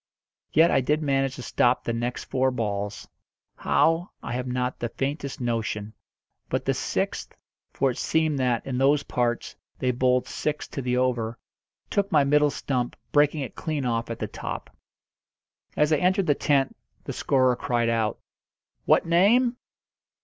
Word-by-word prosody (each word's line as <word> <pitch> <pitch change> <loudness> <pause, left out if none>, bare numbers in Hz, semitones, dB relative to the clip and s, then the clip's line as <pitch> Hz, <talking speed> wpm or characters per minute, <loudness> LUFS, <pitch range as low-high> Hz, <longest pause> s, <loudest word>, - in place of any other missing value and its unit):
Yet 165 +3 +5
I - - +3
did 150 +4 0
manage 135 -2 +1
to 125 - -8
stop 120 +1 +2
the 115 - -2
next 120 +2 -3
four 130 0 +1
balls 105 -4 -3 0.5
how, 165 +3 +2
I - - -5
have 125 +1 -3
not 125 0 -2
the 120 - -2
faintest 140 +2 -3
notion; 110 -3 -2 0.6
but - - -1
the - - +2
sixth - - -2 0.4
for 135 - +1
it - - -7
seemed 155 -3 +1
that, 125 -3 +1
in 130 -2 -2
those 140 +2 +3
parts, 120 -3 -1 0.2
they 125 - +1
bowled 125 0 +2
six 150 0 -3
to 135 - -4
the 125 -1 0
over 120 -3 0 0.5
took 200 -1 0
my 150 -3 +5
middle 150 +1 +4
stump, 125 -3 -2 0.2
breaking 145 +1 +3
it 135 - -5
clean 150 -4 -3
off 115 -1 -1
at 115 - -4
the - - -3
top. - - -7 1.0
As 150 +1 +3
I - - +4
entered 185 +3 +2
the 145 - +4
tent 140 -1 +1 0.3
the - - -5
scorer 130 -2 +2
cried 120 -1 0
out 115 -2 0 0.7
"What - - +4
name?" 225 +9 +4
130 Hz, 165 wpm, -26 LUFS, 120-150 Hz, 1.0 s, Yet